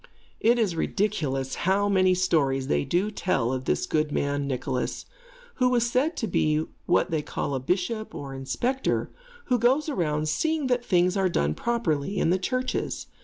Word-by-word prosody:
It 235 Hz, +2 st, +4 dB
is 210 Hz, -7 st, +1 dB
ridiculous 150 Hz, -9 st, -1 dB, 0.2 s
how 200 Hz, +1 st, +3 dB
many 185 Hz, -2 st, +3 dB
stories 140 Hz, -7 st, +1 dB
they 70 Hz, 0 st, +2 dB
do 190 Hz, +5 st, 0 dB
tell 135 Hz, -, 0 dB
of 130 Hz, 0 st, -3 dB
this -, -, 0 dB
good 155 Hz, -1 st, 0 dB
man, 140 Hz, -1 st, -1 dB
Nicholas, 130 Hz, -1 st, -2 dB, 0.5 s
who 250 Hz, -1 st, +3 dB
was 240 Hz, -1 st, +2 dB
said 290 Hz, +7 st, +1 dB
to 225 Hz, -, -1 dB
be 155 Hz, -3 st, +1 dB, 0.2 s
what 175 Hz, -, +2 dB
they 160 Hz, -2 st, +1 dB
call 145 Hz, -, -3 dB
a 135 Hz, -, 0 dB
bishop, 185 Hz, -, -2 dB
or 140 Hz, -1 st, -6 dB
inspector, 240 Hz, -, -1 dB, 0.3 s
who 250 Hz, -2 st, +1 dB
goes 265 Hz, +7 st, +2 dB
around 155 Hz, -, -1 dB
seeing 315 Hz, -, 0 dB
that 250 Hz, -1 st, +1 dB
things 180 Hz, -3 st, +2 dB
are 190 Hz, -2 st, +2 dB
done 75 Hz, -, +1 dB
properly 195 Hz, -, -1 dB
in 165 Hz, -, +2 dB
the 185 Hz, -, +2 dB
churches. 255 Hz, +6 st, -2 dB
180 Hz, 170 wpm, -26 LUFS, 145-235 Hz, 0.5 s, It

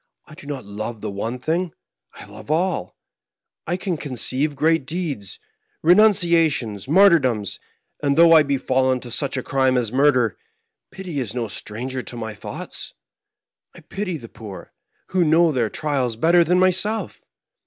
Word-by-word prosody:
I -, -, -15 dB
do 145 Hz, -, -13 dB
not 135 Hz, -6 st, -5 dB
love 105 Hz, +2 st, -6 dB
the -, -, -4 dB
one 110 Hz, +5 st, -4 dB
thing: 165 Hz, +6 st, -2 dB, 0.4 s
I -, -, -11 dB
love 105 Hz, +4 st, -13 dB
alL 165 Hz, -, -1 dB, 0.7 s
I 175 Hz, +2 st, -1 dB
can 185 Hz, -3 st, -3 dB
conceive 135 Hz, +2 st, 0 dB
great 160 Hz, 0 st, +1 dB
deeds, 155 Hz, -, -5 dB, 0.4 s
renunciations, 165 Hz, -, +3 dB
martyrdoms, 145 Hz, -, +3 dB, 0.4 s
and 140 Hz, 0 st, +1 dB
though 165 Hz, 0 st, +7 dB
I 160 Hz, -, +8 dB
be 140 Hz, -2 st, 0 dB
fallen 130 Hz, 0 st, +1 dB
to 120 Hz, -, -10 dB
such 135 Hz, +3 st, -2 dB
a 130 Hz, -, -3 dB
crime 130 Hz, -2 st, +1 dB
as 115 Hz, -3 st, -1 dB
murder, 130 Hz, -5 st, +2 dB, 0.5 s
pity 185 Hz, -6 st, -6 dB
is 120 Hz, -3 st, -4 dB
no 120 Hz, -2 st, -2 dB
stranger 125 Hz, +5 st, -4 dB
to 120 Hz, -, -7 dB
my 110 Hz, -1 st, -5 dB
thoughts. -, -, -7 dB, 0.8 s
I -, -, -13 dB
pity 195 Hz, -4 st, -4 dB
the 120 Hz, -5 st, -11 dB
poor; 105 Hz, -4 st, -11 dB, 0.4 s
who 185 Hz, -1 st, +2 dB
knows 165 Hz, 0 st, +4 dB
their 120 Hz, -4 st, 0 dB
trials 135 Hz, -6 st, -1 dB
better 170 Hz, +8 st, +4 dB
than 180 Hz, +2 st, +2 dB
myself 185 Hz, +3 st, +1 dB
140 Hz, 155 wpm, -22 LUFS, 120-170 Hz, 0.8 s, I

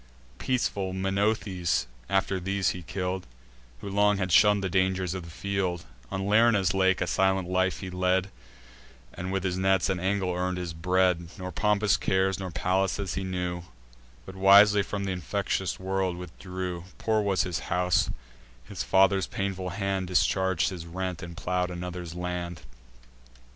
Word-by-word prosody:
Peaceful 100 Hz, -7 st, -1 dB
Menoetes 95 Hz, -1 st, 0 dB, 0.2 s
after 95 Hz, -1 st, +1 dB
these 95 Hz, +1 st, 0 dB
he 90 Hz, -, -4 dB
kill'd, 90 Hz, +1 st, -4 dB, 0.5 s
Who -, -, -7 dB
long 105 Hz, +1 st, +3 dB
had 95 Hz, -2 st, -2 dB
shunn'd 105 Hz, +2 st, +5 dB
the -, -, +1 dB
dangers 95 Hz, -1 st, +1 dB
of 95 Hz, -, -4 dB
the -, -, -10 dB
field: 90 Hz, 0 st, -2 dB, 0.2 s
On 95 Hz, 0 st, -3 dB
Lerna's 105 Hz, -3 st, +4 dB
lake 95 Hz, -1 st, +2 dB
a -, -, +2 dB
silent 95 Hz, +1 st, +1 dB
life 95 Hz, 0 st, 0 dB
he 95 Hz, -2 st, -6 dB
led, 90 Hz, +1 st, +1 dB, 0.8 s
And 90 Hz, +1 st, -5 dB
with 95 Hz, -1 st, -1 dB
his 95 Hz, -1 st, -1 dB
nets 95 Hz, -1 st, +2 dB
and 95 Hz, -2 st, -1 dB
angle 95 Hz, -1 st, 0 dB
earn'd 90 Hz, +1 st, -1 dB
his 90 Hz, -2 st, -4 dB
bread; 90 Hz, 0 st, +1 dB
Nor 90 Hz, -1 st, -5 dB
pompous 105 Hz, +3 st, +2 dB
cares, 95 Hz, 0 st, +1 dB
nor 95 Hz, -1 st, -4 dB
palaces, 95 Hz, +2 st, 0 dB
he 95 Hz, -, -3 dB
knew, 90 Hz, -1 st, -3 dB, 0.6 s
But 95 Hz, -, -10 dB
wisely 100 Hz, +2 st, +7 dB
from 100 Hz, 0 st, -3 dB
th' -, -, -2 dB
infectious 90 Hz, -8 st, -2 dB
world 95 Hz, -1 st, -1 dB
withdrew: 90 Hz, 0 st, -6 dB
Poor 110 Hz, -1 st, +1 dB
was 100 Hz, -2 st, +1 dB
his 90 Hz, -3 st, -2 dB
house; 90 Hz, -3 st, +2 dB, 0.5 s
his 95 Hz, +8 st, -6 dB
father's 95 Hz, 0 st, +3 dB
painful 95 Hz, -2 st, -3 dB
hand 95 Hz, -1 st, -2 dB
Discharg'd 95 Hz, -1 st, +2 dB
his 85 Hz, -3 st, -7 dB
rent, 90 Hz, -1 st, -4 dB
and 85 Hz, -2 st, -8 dB
plow'd 90 Hz, -2 st, -1 dB
another's 90 Hz, -1 st, -6 dB
land. 90 Hz, -1 st, -4 dB
95 Hz, 155 wpm, -27 LUFS, 90-95 Hz, 0.8 s, wisely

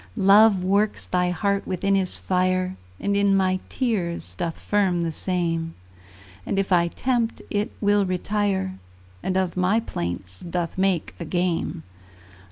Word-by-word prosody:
Love 200 Hz, 0 st, +6 dB
works 200 Hz, +3 st, +1 dB
thy 180 Hz, 0 st, +1 dB
heart 200 Hz, +3 st, 0 dB
within 195 Hz, +2 st, 0 dB
his 190 Hz, -2 st, +1 dB
fire, 185 Hz, 0 st, 0 dB, 0.2 s
And 200 Hz, 0 st, 0 dB
in 200 Hz, -1 st, +3 dB
my 185 Hz, -1 st, +2 dB
tears 175 Hz, -, -2 dB
doth 165 Hz, -, -3 dB
firm 190 Hz, -4 st, +1 dB
the 165 Hz, -, -1 dB
same; 165 Hz, -1 st, -2 dB, 0.7 s
And 195 Hz, -, -2 dB
if 195 Hz, 0 st, 0 dB
I 170 Hz, -1 st, +4 dB
tempt, 240 Hz, +4 st, -1 dB
it 210 Hz, +3 st, -1 dB
will 205 Hz, -1 st, +3 dB
retire, 190 Hz, 0 st, -1 dB, 0.4 s
And 185 Hz, 0 st, -1 dB
of 185 Hz, -2 st, 0 dB
my 185 Hz, +4 st, +2 dB
plaints 90 Hz, -, -5 dB
doth 170 Hz, -1 st, -3 dB
make 190 Hz, -3 st, 0 dB
a 170 Hz, -, -4 dB
game. 175 Hz, -1 st, -1 dB
185 Hz, 145 wpm, -24 LUFS, 175-200 Hz, 0.7 s, Love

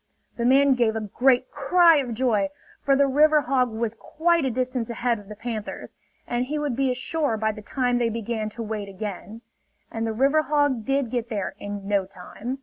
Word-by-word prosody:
The 235 Hz, -, -2 dB
man 270 Hz, +2 st, +5 dB
gave 235 Hz, -3 st, +1 dB
a -, -, 0 dB
great 250 Hz, +5 st, +2 dB
cry 330 Hz, +3 st, +5 dB
of 250 Hz, -5 st, -2 dB
joy; 215 Hz, -5 st, +1 dB, 0.3 s
for 275 Hz, -1 st, +3 dB
the 280 Hz, +1 st, +4 dB
river 300 Hz, +3 st, +4 dB
hog 255 Hz, -2 st, +1 dB
was 225 Hz, 0 st, -2 dB
quite 335 Hz, +7 st, 0 dB
a -, -, +1 dB
distance 250 Hz, -1 st, -2 dB
ahead 235 Hz, 0 st, -1 dB
of 205 Hz, 0 st, -15 dB
the 210 Hz, -, -7 dB
panthers, 220 Hz, -1 st, -6 dB, 0.3 s
and 245 Hz, +1 st, -1 dB
he 300 Hz, +4 st, -3 dB
would 295 Hz, -4 st, -2 dB
be 270 Hz, +1 st, +1 dB
ashore 255 Hz, 0 st, -1 dB
by 220 Hz, 0 st, 0 dB
the 215 Hz, 0 st, -10 dB
time 245 Hz, +2 st, 0 dB
they 235 Hz, -1 st, +1 dB
began 225 Hz, -1 st, -3 dB
to 230 Hz, -, -3 dB
wade 210 Hz, -2 st, -4 dB
again. 205 Hz, +3 st, -7 dB, 0.5 s
And 225 Hz, 0 st, -2 dB
the 220 Hz, -, -2 dB
river 275 Hz, +7 st, +3 dB
hog 290 Hz, -7 st, +1 dB
did 275 Hz, -3 st, 0 dB
get 240 Hz, -2 st, -2 dB
there 205 Hz, -5 st, -3 dB
in 205 Hz, -1 st, -6 dB
no 200 Hz, -2 st, +1 dB
time. 205 Hz, +7 st, -7 dB
245 Hz, 205 wpm, -24 LUFS, 220-275 Hz, 0.5 s, man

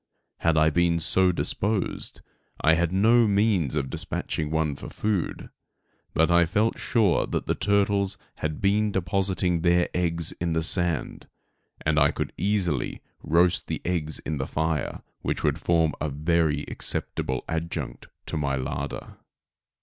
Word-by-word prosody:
Had 80 Hz, -1 st, +2 dB
I 80 Hz, 0 st, +4 dB
been 85 Hz, +1 st, +2 dB
so 90 Hz, +3 st, +3 dB
disposed 100 Hz, +3 st, -2 dB, 0.4 s
I 80 Hz, -, +4 dB
had 85 Hz, +1 st, +1 dB
no 115 Hz, +5 st, +4 dB
means 100 Hz, -, +2 dB
of 70 Hz, -3 st, -1 dB
dispatching 75 Hz, +3 st, -3 dB
one 80 Hz, -2 st, 0 dB
for -, -, -9 dB
food, 105 Hz, -5 st, -2 dB, 0.6 s
but 80 Hz, +2 st, +3 dB
I 85 Hz, -1 st, +5 dB
felt 110 Hz, +6 st, +1 dB
sure 105 Hz, -8 st, +2 dB
that -, -, -2 dB
the -, -, +1 dB
turtles 100 Hz, -1 st, +1 dB, 0.2 s
had 80 Hz, +3 st, -4 dB
been 105 Hz, +2 st, +2 dB
depositing 95 Hz, -2 st, 0 dB
their 85 Hz, 0 st, +3 dB
eggs 85 Hz, -2 st, 0 dB
in 85 Hz, -1 st, 0 dB
the 80 Hz, 0 st, 0 dB
sand, 85 Hz, -2 st, 0 dB, 0.6 s
and 75 Hz, 0 st, +3 dB
I 70 Hz, 0 st, +5 dB
could -, -, -4 dB
easily 95 Hz, -9 st, -1 dB, 0.2 s
roast 85 Hz, +2 st, +2 dB
the -, -, -3 dB
eggs 80 Hz, -4 st, -1 dB
in 75 Hz, -2 st, -4 dB
the 65 Hz, -, -2 dB
fire, 80 Hz, 0 st, -2 dB, 0.2 s
which -, -, -2 dB
would -, -, +1 dB
form 80 Hz, -2 st, +2 dB
a 75 Hz, -, 0 dB
very 75 Hz, 0 st, +1 dB
acceptable 65 Hz, -1 st, -2 dB
adjunct 80 Hz, +1 st, -4 dB, 0.2 s
to -, -, -4 dB
my 70 Hz, -3 st, 0 dB
larder. 70 Hz, +1 st, -5 dB
85 Hz, 150 wpm, -26 LUFS, 80-95 Hz, 0.6 s, I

